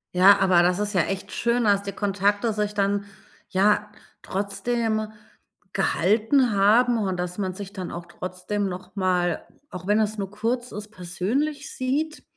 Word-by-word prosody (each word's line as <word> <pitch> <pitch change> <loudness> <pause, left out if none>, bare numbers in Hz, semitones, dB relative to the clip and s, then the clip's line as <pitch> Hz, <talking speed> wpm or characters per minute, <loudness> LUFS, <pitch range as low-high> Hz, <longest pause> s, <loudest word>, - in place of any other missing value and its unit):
Ja, 190 +3 +7
aber 185 -3 +5
das 180 +2 +2
ist 210 0 -1
ja 185 - +4
echt 190 +3 -3
schön, 235 0 +1
dass 200 -1 +3
die 200 - -4
Kontakte 205 +2 0
sich 210 0 -1
dann 200 0 0 0.4
ja 210 +2 +2 0.3
trotzdem 215 +3 -1 0.6
gehalten 220 - +2
haben 230 +5 +4
und 190 -4 -1
dass 180 +1 -4
man 190 -2 -2
sich 200 +1 -8
dann 185 -3 -5
auch 170 0 -7
trotzdem 185 +4 -3
noch 185 +2 -8
mal, 180 -3 0 0.2
auch 180 -2 -8
wenn 210 +2 +3
es 215 0 0
nur 195 -2 -4
kurz 235 +4 -2
ist, 210 +1 -7
persönlich 225 - -2
sieht. 290 +5 -2
205 Hz, 160 wpm, -24 LUFS, 185-220 Hz, 0.6 s, Ja